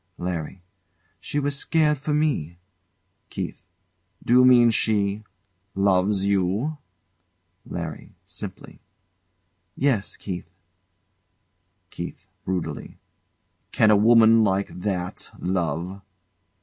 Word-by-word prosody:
LARRY. 90 0 -5 0.6
She - - -5
was 145 0 0
scared 150 0 +1
for 150 +2 -3
me. 145 - 0 0.7
KEITH. - - -5 0.6
D'you 125 +2 +5
mean 120 -2 +6
she 105 -2 0 0.5
loves 95 0 +2
you? 100 - 0 0.9
LARRY. 85 -3 -6
[Simply] - - -8 1.0
Yes, 125 -8 0
Keith. 90 -3 -6 1.4
KEITH. 85 +2 -8 0.2
[Brutally] 90 -2 -4 0.7
Can 110 - +4
a - - +6
woman 115 +1 +6
like 100 -1 +1
that 90 -1 -4
love? 90 +1 -2
100 Hz, 85 wpm, -24 LUFS, 90-120 Hz, 1.4 s, mean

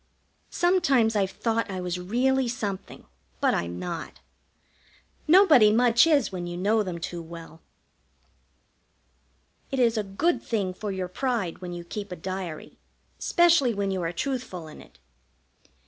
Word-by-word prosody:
Sometimes 280 -11 +2
I've 195 -2 +1
thought 230 +2 -1
I 190 -1 -4
was 180 0 -3
really 250 +7 +1
something, 210 -6 -5 0.3
but - - +2
I'm 85 0 -2
not. 170 - -6 1.1
Nobody 305 - +7
much 235 +4 +5
is 290 -9 +3
when 175 -2 -5
you 175 0 -5
know 210 +4 +2
them 185 -4 -4
too 170 0 -5
well. 165 -1 -11 2.1
It 270 - -3
is 235 -3 +3
a - - -1
good 245 - 0
thing 200 -5 -2
for 205 +2 -5
your 190 -1 -3
pride 215 -3 -2
when 180 -1 -7
you 175 0 -6
keep 200 +3 -7
a - - -4
diary, 185 -2 -6 0.4
specially 335 - +3
when 200 -1 -1
you 190 -1 -2
are 165 -1 -2
truthful 185 - -4
in 155 - -12
it. - - -18
200 Hz, 145 wpm, -26 LUFS, 180-250 Hz, 2.1 s, Nobody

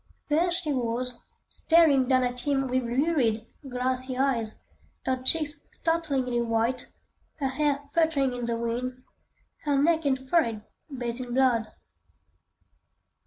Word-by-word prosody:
There 330 +4 +3
she 345 -4 -1
was, 250 0 -1 0.3
staring 310 -6 +4
down 255 -1 +3
at 250 0 -2
him 270 +1 0
with 255 +1 +1
lurid, 240 -3 +1 0.2
glassy 255 +1 0
eyes; 245 -5 0 0.5
her 260 -1 0
cheeks 300 +2 +2 0.2
startlingly 275 -8 0
white, 230 +2 0 0.5
her 275 -4 -1
hair 285 +1 0
fluttering 310 -6 +2
in 245 -1 -3
the 235 -1 -1
wind, 250 +2 -3 0.6
her 290 -2 +1
neck 320 +3 +3
and 270 -2 +2
forehead 230 -9 +1 0.3
bathed 245 -3 -3
in 245 -1 -4
blood. 250 -4 +3
260 Hz, 125 wpm, -27 LUFS, 245-290 Hz, 0.6 s, staring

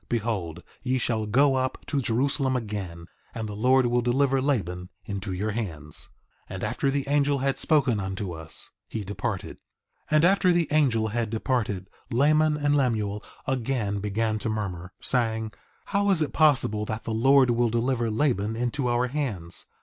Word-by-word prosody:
Behold 100 -8 -2 0.2
ye 130 0 0
shall 110 -3 -1
go 135 +6 +4
up 130 0 -2
to 140 -3 -1
Jerusalem 130 +2 +1
again, 100 -8 -4 0.3
and 110 -2 -3
the 105 - -6
Lord 130 +4 +4
will 120 0 +2
deliver 135 +2 +2
Laban 90 - -1 0.2
into 100 -2 -4
your 100 +4 -2
hands. 80 -9 -3 0.4
3:30 - - -6
And - - -6
after 140 - 0
the 140 0 -1
angel 145 0 +2
had 135 0 0
spoken 140 -8 +3
unto 95 0 -4
us, 80 -1 -4 0.2
he 110 - -4
departed. 100 +1 -4 0.5
3:31 155 - +2
And 155 +2 +5
after 190 0 +4
the 170 -3 +2
angel 125 -8 +2
had 115 0 -1
departed, 110 -4 -1 0.2
Laman 150 +4 +3
and 145 0 +2
Lemuel 110 -7 0 0.2
again 120 -5 -1
began 110 +2 -1
to 110 - -2
murmur, 95 -5 -4
saying: 110 -3 +1 0.3
How 200 0 +1
is 175 -5 +3
it 150 - -4
possible 135 -9 +3
that 110 +1 -4
the 115 - -3
Lord 130 +2 +5
will 120 0 +2
deliver 120 0 0
Laban 110 -3 0
into 125 +3 -1
our 120 +1 +2
hands? 110 - -2
120 Hz, 170 wpm, -26 LUFS, 105-135 Hz, 0.5 s, And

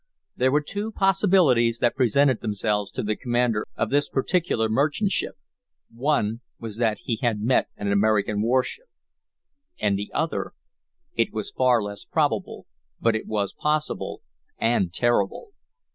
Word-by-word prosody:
There 130 +1 +2
were 150 +2 +3
two 205 +7 -4
possibilities 180 - +3
that 120 0 +2
presented 130 0 +3
themselves 105 -1 -1
to - - -4
the 105 0 0
commander 120 -3 0
of 110 - -1
this 145 +1 +2
particular 135 -5 0
merchantship. 150 - 0 0.6
One 115 -3 0 0.2
was 110 -2 -7
that 110 -3 0
he 115 - -1
had 115 -4 +1
met 120 +5 +2
an 100 -1 -2
American 105 0 +2
warship 130 - 0 0.9
And 100 -1 +1
the 100 - -5
other! 160 +1 -2 0.6
It - - +1
was 110 -2 -5
far 125 -3 +3
less 100 0 -6
probable, - - -1 0.3
but 115 -1 +2
it 110 - -4
was 105 -2 -1
possible, 150 0 -2 0.3
and 115 -6 +1
terrible. 120 - 0
120 Hz, 140 wpm, -24 LUFS, 105-140 Hz, 0.9 s, were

